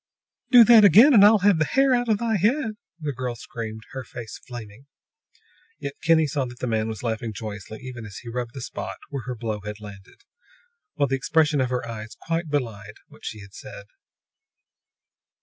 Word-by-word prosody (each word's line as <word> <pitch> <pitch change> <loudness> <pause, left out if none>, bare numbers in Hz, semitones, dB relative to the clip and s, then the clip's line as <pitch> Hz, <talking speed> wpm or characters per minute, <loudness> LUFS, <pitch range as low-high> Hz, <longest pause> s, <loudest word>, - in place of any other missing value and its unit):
"Do 245 -3 +9
that 225 -1 +7
again, 220 - +8
and 205 -4 +8
I'll 215 +2 +7
have 200 -5 +5
the - - +4
hair 270 - +3
out 245 -1 +1
of 215 - +3
thy 225 -1 0
head!" 225 - +1 0.3
the 150 -3 -3
girl 125 -1 -4
screamed, 110 -1 -7
her 130 -1 -6
face 120 -3 -9
flaming. 120 0 -10 0.9
Yet 140 -1 -6
Kinney 165 -1 +4
saw 140 -2 -1
that 120 -1 -9
the - - -4
man 110 -2 0
was 110 -1 -6
laughing 115 -1 -3
joyously 105 0 -8
even 125 -3 -8
as 100 - -10
he 120 - -11
rubbed 120 +1 -5
the 135 - -6
spot - - -6
where 135 -5 -5
her 125 - -3
blow 110 -2 -4
had 105 +1 -7
landed, 100 -2 -13 0.7
while 140 -1 +1
the 135 0 0
expression 150 0 +2
of 130 - 0
her 125 -2 -2
eyes 110 -1 -8
quite 165 0 -3
belied 110 -7 -3
what - - -18
she 110 - -6
had 100 -1 -14
said. 100 - -10
125 Hz, 195 wpm, -24 LUFS, 110-165 Hz, 0.9 s, Do